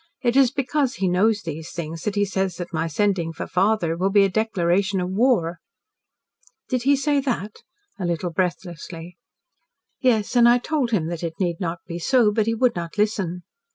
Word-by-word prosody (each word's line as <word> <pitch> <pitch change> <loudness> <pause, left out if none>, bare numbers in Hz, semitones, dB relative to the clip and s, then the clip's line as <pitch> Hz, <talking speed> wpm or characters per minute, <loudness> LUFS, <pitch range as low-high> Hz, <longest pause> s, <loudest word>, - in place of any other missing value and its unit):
It 240 0 +1
is 270 -2 +6
because 275 0 -1
he 190 - -1
knows 205 +4 +2
these 160 0 -6
things 165 -1 -6
that 210 -1 -1
he 205 0 +2
says 190 -2 -2
that 175 0 -7
my 160 +1 -1
sending 175 0 0
for 165 - -6
father 185 -2 +1
will 185 +3 0
be 200 0 +5
a 195 - +2
declaration 190 -2 +1
of 180 0 -2
war." 190 -6 +1 1.1
"Did 255 -2 0
he 280 +3 +4
say 285 +1 +1
that?" 235 -6 -3 0.4
a 185 - -2
little 175 +1 -2
breathlessly. 175 -1 -4 0.8
"Yes, 230 -3 +1
and 235 -1 +7
I 240 - +6
told 270 0 -1
him 205 -9 0
that 170 -2 -5
it 165 -1 -5
need 175 -3 -1
not 170 -2 -3
be 170 -1 -6
so. 235 +2 +3
But 215 +1 0
he 230 - +1
would 250 +2 +2
not 170 +2 -6
listen." 195 -5 -1
195 Hz, 190 wpm, -23 LUFS, 170-230 Hz, 1.1 s, and